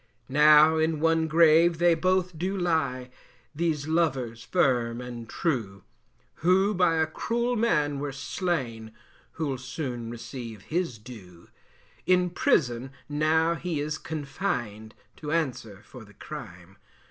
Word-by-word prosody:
Now 150 +3 +6
in 160 -1 +1
one 165 0 +2
grave 165 +1 +5
they 175 0 +4
both 185 +1 0
do 185 +5 -2
lie, 160 -8 -1 0.4
These 155 -2 -1
lovers 135 -8 0
firm 125 -8 +1
and 120 -2 -8
true, 110 - -2 0.5
Who 190 +5 +3
by 180 -3 +2
a 160 0 +2
cruel 235 +9 -2
man 150 -11 +1
were 145 0 -3
slain, 130 - -3 0.4
Who'll 140 -5 -3
soon 125 -3 -5
receive 120 -3 -8
his 165 -7 -2
due. 105 -7 -13 0.6
In 180 -1 +3
prison 130 -7 +1 0.2
now 160 +3 +2
he 170 -2 -3
is 150 +1 -3
confined, 125 - -4 0.2
To 150 -1 -6
answer 120 -10 -2
for 120 +1 -12
the 105 -1 -18
crime. 95 - -10
150 Hz, 125 wpm, -27 LUFS, 120-165 Hz, 0.6 s, Now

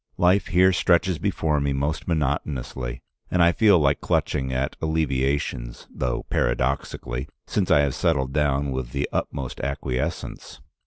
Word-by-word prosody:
Life 90 +3 +3
here 95 +1 +4
stretches 85 -1 +2
before 75 0 0
me 70 -1 0
most 70 +3 -2
monotonously, 65 -5 -2 0.3
and 90 -1 +3
I 85 - +6
feel 100 +1 +5
like 70 -3 +2
clutching 65 -1 0
at 65 +1 -1
alleviations, 70 -5 -1
though 60 -2 -2
paradoxically, 60 +1 -1 0.2
since 100 -4 -1
I 75 - +6
have 70 -2 +1
settled 70 -5 0
down 70 -1 +1
with 65 -2 -4
the 70 +1 -1
utmost 65 -3 -3
acquiescence. 70 -2 -4
70 Hz, 140 wpm, -24 LUFS, 65-80 Hz, 0.3 s, I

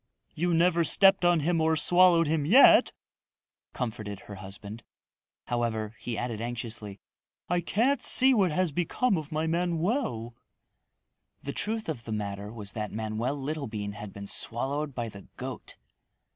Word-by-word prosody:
"You 175 +3 -1
never 170 0 +3
stepped 195 +3 +4
on 175 -2 +4
him 165 +2 +1
or 160 0 +2
swallowed 175 +1 +5
him 155 -1 0
yet," 225 - +7 0.8
comforted 110 -5 -5
her 105 - -11
husband. 100 +3 -9 0.6
However, 115 -2 -2
he 120 -2 -4
added 115 -3 -3
anxiously, 115 -4 -6 0.5
"I 175 0 0
can't 235 +11 +1
see 260 +1 +6
what 195 -7 +2
has 180 +1 0
become 180 - 0
of 155 -1 -5
my 155 +1 -1
Manoel." 170 - -1 1.1
The 140 - -4
truth 220 +1 -2
of 135 -8 -5
the 110 - -6
matter 100 -1 -4
was 105 -3 -6
that 105 -2 -5
Manoel 110 +5 -2
Littlebean 135 -8 -4
had 105 0 -8
been 100 +1 -9
swallowed 135 +7 -3
by 120 -2 -3
the 100 -3 -11
goat. - - -7
140 Hz, 145 wpm, -28 LUFS, 110-175 Hz, 1.1 s, yet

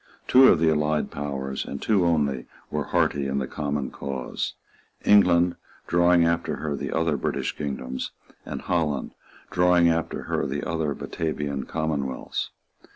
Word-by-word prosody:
Two 130 +1 +8
of - - +6
the 80 0 +4
allied 75 0 0
powers, 70 -2 -3
and 70 - -6
two 100 -5 +2
only, 70 -6 +1 0.2
were - - -1
hearty 70 -1 +1
in 70 0 -1
the 65 - 0
common 70 -1 -3
cause; 65 -3 -4 0.5
England, 90 -4 +5 0.3
drawing 85 0 +4
after 85 0 0
her 75 -2 -3
the - - -4
other 80 -1 +1
British - - -2
kingdoms; 65 -3 -4 0.3
and - - -6
Holland, 80 -6 -1 0.4
drawing 90 -1 +4
after 80 -1 -1
her 65 - -1
the 70 +2 -3
other 80 -4 -1
Batavian 75 -4 -3
commonwealths. 75 -4 -2
75 Hz, 145 wpm, -25 LUFS, 70-85 Hz, 0.5 s, Two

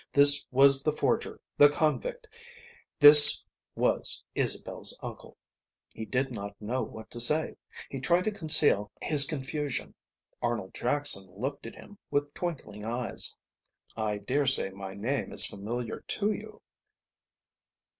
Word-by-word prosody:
This 145 0 +4
was 135 +1 +3
the 155 - -2
forger, 150 - -4 0.2
the 145 - +6
convict, 460 - -4 0.7
this 145 0 +10 0.3
was - - -2
Isabel's - - +1
uncle. - - -11 0.6
He 110 - -9
did 135 +3 -3
not 100 -3 -10
know 120 +5 -5
what 110 0 -11
to 120 - -9
say. 150 +7 +1 0.3
He 135 - -9
tried 175 +7 -1
to 215 - -3
conceal 150 - 0
his 145 -3 +4
confusion. 145 -1 -6 0.5
Arnold 120 -6 -5
Jackson 125 -7 -1
looked 130 +9 -8
at - - -12
him 205 0 -17
with 145 0 -4
twinkling 130 - -8
eyes. 120 +2 -3 0.6
"I 110 -2 -4
daresay 130 0 0
my 95 0 -11
name 125 +7 -5
is - - +6
familiar 115 +4 -7
to 210 0 -4
you." - - -11
135 Hz, 130 wpm, -26 LUFS, 110-150 Hz, 0.7 s, this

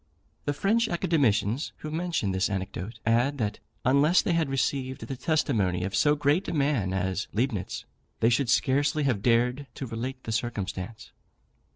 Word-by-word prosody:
The 145 - 0
French 220 +9 +2
Academicians 135 - +1
who 155 - -7
mention 165 - -1
this 95 +2 +1
anecdote, 95 +2 -4
add, 120 +5 +2
that 105 -4 -2 0.3
unless 140 +7 +4
they 175 - +1
had 165 -4 +1
received 135 -1 -1
the 135 - -5
testimony 110 - +1
of 95 +2 -2
so 150 -2 +4
great 145 +6 +1
a - - -2
man 140 -10 +1
as 95 +2 -1
Leibnitz, 110 -4 -2 0.3
they 115 - +4
should 125 +1 +2
scarcely 145 +5 +2
have 125 -8 +1
dared 125 +4 +2
to 135 - -5
relate 125 +3 -5
the 115 - -4
circumstance. 105 -3 -4
125 Hz, 160 wpm, -27 LUFS, 105-145 Hz, 0.3 s, unless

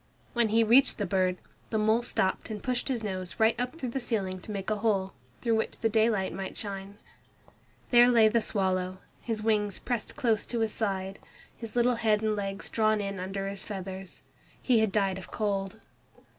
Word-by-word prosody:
When 235 -2 +2
he 225 +2 +4
reached 245 +5 +5
the 205 - -1
bird, 185 -1 +1 0.3
the 220 - 0
mole 220 +2 +3
stopped 190 -5 -1
and 210 -2 -6
pushed 250 -1 -1
his 245 -5 -1
nose 185 -3 -4
right 220 0 +4
up 250 +6 -2
through 255 -6 -4
the 270 - -2
ceiling 195 -7 -2
to - - -10
make 200 0 -3
a 215 - +1
hole, 200 -3 0 0.3
through 230 -2 +2
which 220 - -2
the 225 - +1
daylight 215 -4 +2
might 190 +1 -5
shine. 200 -1 -6 0.9
There 240 0 +7
lay 230 -3 +6
the 230 +1 +2
swallow, 185 -3 0 0.2
his 225 -2 -3
wings 210 -2 +1
pressed 240 -4 -3
close 235 -7 +1
to 235 -2 -2
his 220 -1 0
side 195 -2 -2 0.4
His 230 -1 -8
little 245 0 +3
head 215 -2 +2
and 215 -1 +1
legs 195 -1 -4
drawn 215 -1 +2
in 200 -1 -3
under 195 +1 -3
his 195 0 -3
feathers. 190 -2 -7 0.4
He 245 -4 +3
had 220 -2 +2
died 195 -2 +1
of 185 - -11
cold. 200 -1 -2
215 Hz, 195 wpm, -29 LUFS, 195-230 Hz, 0.9 s, There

